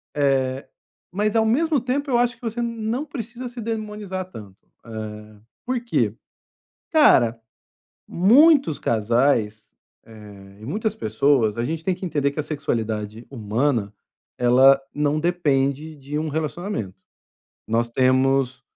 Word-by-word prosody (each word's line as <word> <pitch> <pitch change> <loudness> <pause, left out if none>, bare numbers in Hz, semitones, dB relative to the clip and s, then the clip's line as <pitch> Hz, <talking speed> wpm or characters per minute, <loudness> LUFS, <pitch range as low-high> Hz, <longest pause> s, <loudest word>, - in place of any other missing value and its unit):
Eh, 135 -2 0 0.4
mas 210 +4 -1
ao 225 - +3
mesmo 295 +6 +2
tempo, 270 +2 -2
eu 240 - +3
acho 245 0 +1
que - - -34
você 235 0 -3
não 230 +2 -2
precisa 245 -2 -7
se 245 0 -10
demonizar 210 -4 -4
tanto, 100 - -13 0.2
eh, 105 -1 -8 0.3
por 255 0 -1
quê? 235 - 0 0.8
Cara, 125 - +5 0.7
muitos 260 - +5
casais, 110 -1 0 0.3
eh, 100 -3 -14
e - - -9
muitas 215 - -2
pessoas 115 - +1
a 115 - 0
gente 160 +4 -3
tem 190 - +1
que 185 - -8
entender 145 -4 0
que - - -10
a - - -2
sexualidade 115 -7 -3
humana 115 -2 -1 0.5
ela 130 +3 +5
não 150 +1 0
depende 150 -3 0
de 140 +2 -5
um 155 +1 -2
relacionamento, 155 - -4 0.7
nós 115 +1 +1
temos 130 +1 +2
145 Hz, 130 wpm, -22 LUFS, -, 0.8 s, Cara